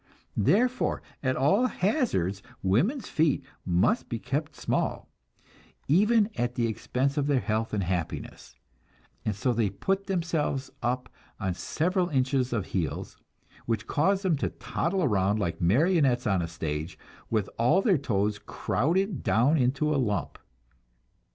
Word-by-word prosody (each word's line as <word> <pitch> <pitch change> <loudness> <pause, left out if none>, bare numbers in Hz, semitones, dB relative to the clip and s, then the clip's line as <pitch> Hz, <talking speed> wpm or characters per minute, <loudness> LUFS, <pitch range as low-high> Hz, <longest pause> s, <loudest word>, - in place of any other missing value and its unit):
Therefore 240 - +2 0.2
at 130 -1 0
all 195 - +3
hazards 180 - 0 0.2
women's 175 - +1
feet 150 -3 +1 0.2
must 90 - +2
be 115 - -2
kept 140 +6 -3
small, - - -1 0.8
even 210 +7 +4
at 120 0 -1
the 120 - +1
expense 130 +5 -1
of 145 -1 +1
their 140 -3 +3
health 110 -1 -1
and 105 -2 0
happiness; 90 -2 -4 0.7
and 105 - 0
so 120 +5 0
they 115 -3 +1
put 195 - -2
themselves 165 -7 -1
up 125 +2 -1 0.3
on 95 -3 -1
several 180 - 0
inches 130 -2 +1
of 105 -6 -1
heels, 85 -6 -3 0.5
which 115 -1 -1
cause 190 - +1
them 175 -5 +2
to - - -1
toddle 180 +2 -2
around 100 -5 +2
like 85 -6 -2
marionettes 130 - +3
on 95 -5 +2
a 85 - -2
stage, 80 0 -4 0.3
with 110 -3 0
all 125 +12 +4
their 190 - +3
toes 105 -5 0
crowded 175 - -1
down 125 +8 +3
into 140 +2 +1
a - - +1
lump. 105 -5 -2
130 Hz, 140 wpm, -28 LUFS, 105-170 Hz, 0.8 s, even